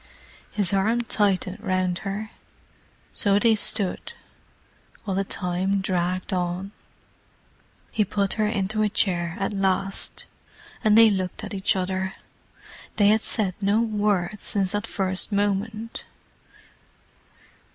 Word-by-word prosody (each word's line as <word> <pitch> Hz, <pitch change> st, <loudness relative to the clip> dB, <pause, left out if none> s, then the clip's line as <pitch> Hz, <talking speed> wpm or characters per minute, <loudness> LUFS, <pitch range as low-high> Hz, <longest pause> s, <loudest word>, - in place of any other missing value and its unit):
His 200 Hz, -3 st, +2 dB
arm 220 Hz, +5 st, +2 dB
tightened 200 Hz, -3 st, 0 dB
round 185 Hz, -2 st, 0 dB
her. 205 Hz, +2 st, -4 dB, 0.8 s
So 200 Hz, -1 st, +3 dB
they 225 Hz, +2 st, +4 dB
stood, 205 Hz, -2 st, +1 dB, 0.9 s
while 195 Hz, -3 st, -2 dB
the 195 Hz, -, +1 dB
time 190 Hz, +1 st, -1 dB
dragged 185 Hz, 0 st, -1 dB
on. 180 Hz, +2 st, -2 dB, 1.2 s
He 215 Hz, -, +2 dB
put 200 Hz, 0 st, 0 dB
her 215 Hz, -1 st, +1 dB
into 215 Hz, 0 st, -1 dB
a 215 Hz, -, +3 dB
chair 175 Hz, -4 st, 0 dB
at 195 Hz, +2 st, -1 dB
last, 195 Hz, 0 st, -1 dB, 0.6 s
and 215 Hz, 0 st, +5 dB
they 225 Hz, -1 st, +8 dB
looked 185 Hz, +1 st, -3 dB
at 210 Hz, -, -6 dB
each 195 Hz, 0 st, +1 dB
other: 190 Hz, 0 st, -2 dB, 0.8 s
they 205 Hz, -1 st, +5 dB
had 215 Hz, +1 st, +4 dB
said 200 Hz, -5 st, -1 dB
no 200 Hz, +2 st, +3 dB
word 210 Hz, -3 st, 0 dB
since 195 Hz, -2 st, -1 dB
that 205 Hz, -1 st, -2 dB
first 190 Hz, +1 st, -1 dB
moment. 205 Hz, +3 st, -1 dB
195 Hz, 120 wpm, -25 LUFS, 185-210 Hz, 1.2 s, they